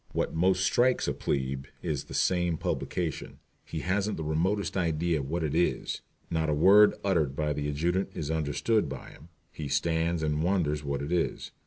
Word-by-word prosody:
What - - -1
most 95 +3 +2
strikes 125 +6 +2
a - - +1
"plebe" 65 -1 -2 0.2
is 75 -3 -2
this - - -4
same 90 -3 +1
publication. 85 -1 -3 0.3
He 80 - -5
hasn't 100 +3 0
the 80 - -3
remotest 95 +6 0
idea 85 -2 +1
of 70 -1 -5
what 85 +1 -1
it 75 -2 -1
is. 85 +2 0 0.3
Not 80 -1 0
a 75 - +2
word 100 +7 +7
uttered 80 -9 +1
by 75 0 0
the 75 0 -2
adjutant 85 +6 0
is 75 0 -3
understood 80 +6 +1
by 65 -1 -8
him. 80 +5 -16 0.2
He 75 - -6
stands 80 +3 0
and 75 0 0
wonders 80 -5 +1
what 70 -1 -2
it 75 - -5
is. 90 -1 -1
80 Hz, 185 wpm, -29 LUFS, 75-90 Hz, 0.3 s, word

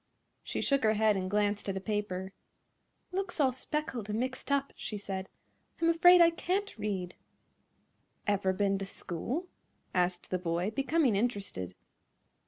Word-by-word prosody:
She - - -3
shook 275 -1 +2
her 220 -2 +4
head 215 0 +4
and 185 -1 -2
glanced 205 0 +1
at 190 - -1
a - - -1
paper. 195 -2 -3 0.8
"It - - -7
looks 385 -3 -2
all 270 -3 +4
speckled 255 -4 -3
and 210 +1 -1
mixed 260 +2 -3
up," 280 0 +1
she 210 - -5
said. 190 -1 -5 0.5
"I'm 335 - +3
afraid 355 +1 +7
I 335 0 +7
can't 380 +4 -2
read." 195 -5 -3 1.1
"Ever 200 -2 +2
ben 195 0 +1
to 195 - -3
school?" 230 - -2 0.5
asked 180 -1 0
the 185 - +1
boy, 175 +3 -1
becoming 275 -1 +2
interested. 195 - -2
210 Hz, 155 wpm, -31 LUFS, 190-275 Hz, 1.1 s, afraid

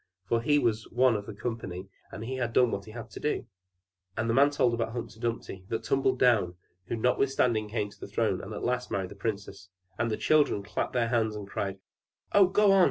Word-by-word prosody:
for 115 0 +2
he 145 +5 +3
was 115 -5 0
one 125 +1 +4
of 105 -1 -4
the 110 - -6
company, 100 -5 -5 0.2
and 110 - -6
had 125 -2 -2
done 125 -1 +4
what 100 - -3
he 110 - -10
had 115 0 -8
to - - -8
do. 150 -3 -1 0.7
And 110 +1 0
the 115 - +2
man 140 +3 +6
told 130 -4 +2
about 115 -1 -1
Humpy 115 -2 -6
Dumpy 115 -5 -3
that 115 0 -2
tumbled 130 +1 +1
down, 110 -9 +3 0.3
who - - -2
notwithstanding 125 -2 +1
came 105 -2 -2
to - - -18
the - - -7
throne, - - 0
and - - -8
at - - -5
last 125 0 -1
married 95 -2 -2
the - - -9
princess. 100 -2 -5 0.3
And 120 0 +1
the 110 - -1
children 150 -9 +3
clapped - - -3
their 120 -2 +1
hands, 110 -3 +1
and 105 -2 -6
cried. 100 -1 -3 0.5
"Oh, 200 -2 +6
go 200 +2 +4
on! 195 - +6
115 Hz, 225 wpm, -29 LUFS, 105-125 Hz, 0.7 s, man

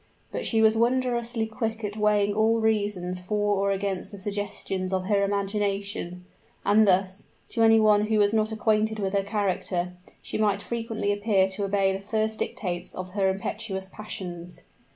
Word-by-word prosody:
But - - -3
she 225 -1 +3
was 220 0 +5
wondrously 235 -1 +1
quick 220 0 -3
at 205 0 -3
weighing 210 -1 +2
all 220 +2 +3
reasons 205 -5 0
for 205 +2 0
or 200 +1 +1
against 195 -1 -2
the 200 - -8
suggestions 200 -2 -3
of 185 -1 -1
her 200 0 +2
imagination; 200 -2 -2 0.4
and 215 +1 +5
thus, 190 +1 +1 0.2
to 230 - -2
any 225 0 +6
one 210 -1 +4
who 220 0 +2
was 205 0 +3
not 220 0 +1
acquainted 220 0 +1
with 195 -2 -2
her 200 - +3
character, 190 -3 -1 0.3
she - - -4
might 205 -2 +2
frequently 225 -3 -2
appear 205 -2 +2
to 200 +1 -2
obey 195 -1 +2
the 190 - -3
first 220 +2 -1
dictates 175 -3 -3
of 185 0 -6
her 195 0 +1
impetuous 190 0 -4
passions. 180 -4 -7
205 Hz, 170 wpm, -26 LUFS, 190-220 Hz, 0.4 s, any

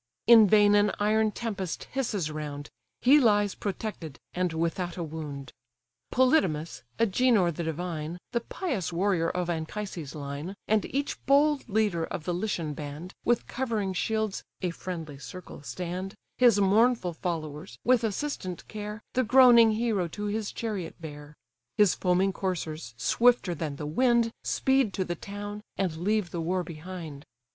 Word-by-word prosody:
In 225 -3 +8
vain 205 0 +5
an 205 0 +4
iron 215 +1 +3
tempest 200 -6 -4
hisses 210 - -1
round; 145 -1 -6 0.3
He 280 +4 +7
lies 205 -5 +3
protected, 195 -7 -5 0.2
and 180 -1 0
without 170 +2 -2
a 175 - -2
wound. 150 -4 -7 0.6
Polydamas, 185 - +2 0.2
Agenor 225 -4 +3
the 170 - -5
divine, 160 0 -3
The 235 - +1
pious 235 - -3
warrior 175 -1 +1
of 180 -1 -2
Anchises' 165 -2 -4
line, 145 +5 -5
And 215 -1 +2
each 280 +1 -3
bold 285 -1 +3
leader 205 -5 +1
of 160 - -5
the 175 - -2
Lycian 175 -5 -2
band, 150 +5 -7
With 240 0 +2
covering 225 -7 -2
shields 220 +2 -1 0.2
(a 180 - 0
friendly 165 -5 -6
circle) 145 +6 -9
stand, 180 +5 -5 0.2
His 240 -5 +6
mournful 205 -1 +3
followers, 160 -1 -5
with 250 -1 +4
assistant 205 - -3
care, 210 +1 -6
The 255 - +2
groaning 235 -2 +7
hero 215 -5 0
to 205 +5 -6
his 210 0 -2
chariot 210 -7 -4
bear; 150 -2 -9 0.4
His 205 -6 +5
foaming 185 +1 +1
coursers, 160 -10 -4
swifter 230 - +3
than 150 -3 -4
the 150 - -6
wind, 235 +7 +2
Speed 265 -6 +2
to 190 - -1
the 175 - -2
town, 205 +3 -7 0.2
and 185 -5 0
leave 205 +1 0
the 170 - -3
war 180 +2 0
behind. 160 -3 -8
185 Hz, 150 wpm, -28 LUFS, 165-220 Hz, 0.6 s, In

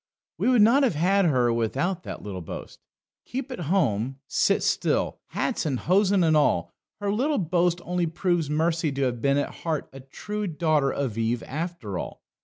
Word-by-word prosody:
We - - +2
would 245 -5 +6
not 240 +6 +5
have 250 - +2
had 190 +5 +3
her 125 -7 +3
without 140 - -1
that - - -7
little 95 -3 -5
boast. 80 - -8 0.4
Keep 265 +1 -5
at 250 - -5
home, 135 - +1
sit - - +1
still, - - 0
hats - - -2
and 140 -5 -1
hosen 195 +1 +3
and 160 -1 +3
all 150 -1 +2 0.3
her 205 -1 -1
little 275 +8 +1
boast 175 -1 +1
only 180 -1 0
proves 170 -2 0
Mercy 160 +1 +1
to 135 0 -1
have 120 -3 -1
been 140 +2 +2
at 145 - -2
heart 160 -3 -2
a 135 - -9
true 210 +10 -5
daughter 155 -4 +1
of 125 -6 -2
Eve 115 +1 0
after 145 - -4
all. - - -7
165 Hz, 185 wpm, -25 LUFS, 135-190 Hz, 0.4 s, would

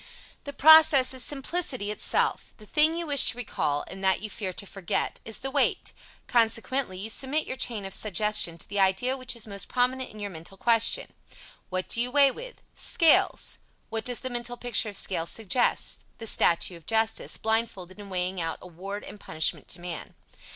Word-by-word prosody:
The 285 - -5
process 315 -3 +7
is 260 -1 -3
simplicity 270 -5 -1
itself. 210 - -1
The 215 - -15
thing 310 +7 +3
you 340 - -3
wish 285 -3 +5
to 225 - +1
recall, 145 -11 -2
and 190 0 -9
that 190 +1 +2
you 215 - -5
fear 190 -2 -4
to 190 - -4
forget, 195 -2 -3
is 225 - -2
the 270 +1 -4
weight; 280 0 +1 0.3
consequently 230 -2 +1
you 200 +4 -5
cement 270 +7 0
your - - -5
chain 225 -6 -2
of 195 - -5
suggestion 210 -4 0
to - - -5
the 205 - -3
idea 195 +7 +2
which 255 -1 -2
is 230 - -4
most 200 -2 -4
prominent 255 +1 0
in 215 - -12
your 205 -1 -5
mental 170 +3 -9
question. 230 +2 +2 0.6
What 185 0 -3
do 230 - 0
you 245 - +1
weigh 275 +1 +5
with? - - -11
Scales. 330 -2 +2 0.3
What 225 0 -4
does 245 -1 -3
the 260 - -4
mental 240 0 -4
picture 240 -2 0
of 200 - +1
scales 170 -3 -1
suggest? 225 +3 0
The 225 - -8
statue 175 -4 +2
of 165 - -20
Justice, 225 0 0
blindfolded 215 -4 -2
and 205 -1 -10
weighing 180 0 -2
out 165 0 -3
award 190 +4 -8
and 210 - -10
punishment 160 -5 -1
to - - -3
man. 175 -2 -7
220 Hz, 190 wpm, -26 LUFS, 190-255 Hz, 0.6 s, process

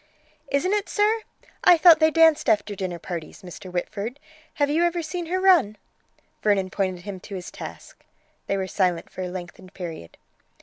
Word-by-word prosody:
"Isn't 330 +8 +1
it, 415 -1 -1
sir? 435 +2 +2 0.4
I 350 - +7
thought 330 -1 +7
they 315 0 +5
danced 320 -1 +4
after 205 0 +2
dinner 185 -2 -4
parties, 170 +2 -7
Mr. 180 +1 -10
Whitford, 205 +8 -4 0.4
have 290 -3 +2
you 310 +4 +2
ever 345 0 0
seen 340 +2 -4
her 370 +3 -1
run?" 345 - +4 0.6
Vernon 195 -3 +1
pointed 185 -3 -2
him 200 -2 -6
to 195 - -9
his 180 -2 -7
task. - - -10 0.4
They 195 - 0
were 190 - -1
silent 180 -3 -1
for - - -7
a 185 - -2
lengthened 180 +1 -9
period. 165 - -8
205 Hz, 175 wpm, -24 LUFS, -, 0.6 s, I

